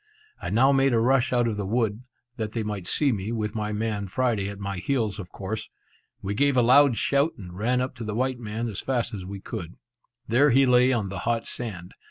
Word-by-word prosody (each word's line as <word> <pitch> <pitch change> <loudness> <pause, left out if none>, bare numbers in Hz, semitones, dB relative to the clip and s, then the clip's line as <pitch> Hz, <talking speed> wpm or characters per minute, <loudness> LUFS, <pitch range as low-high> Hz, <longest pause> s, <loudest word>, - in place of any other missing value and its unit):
I - - -4
now 130 +6 +4
made 135 -2 +3
a - - +3
rush 125 +1 +3
out 120 -1 +2
of 110 -2 -2
the 100 - -2
wood, 110 0 0 0.4
that 110 -1 -3
they 115 - -1
might 105 -4 -4
see 140 +6 +2
me, 105 -1 -3
with 110 -2 -2
my 105 -1 -2
man 105 -1 -2
Friday 110 -2 0
at 100 - -7
my 100 -1 -4
heels, 110 0 -1
of 95 -3 -8
course. 105 +3 -5 0.5
We 100 +1 -2
gave 140 +4 +2
a 125 - +5
loud 130 0 +6
shout, 140 +4 +2
and 90 -3 -10
ran 125 +6 +1
up 130 - -2
to 120 - -6
the 105 -1 -4
white 130 +1 -1
man 115 +1 -4
as 105 -4 -4
fast 125 -4 -1
as 95 -3 -6
we 100 0 -7
could. 90 -7 -6 0.5
There 135 +6 +4
he 135 +1 +5
lay 125 0 +5
on 110 -6 0
the 95 -1 -5
hot 115 +1 -1
sand. 95 -7 -6
115 Hz, 235 wpm, -26 LUFS, 100-125 Hz, 0.5 s, loud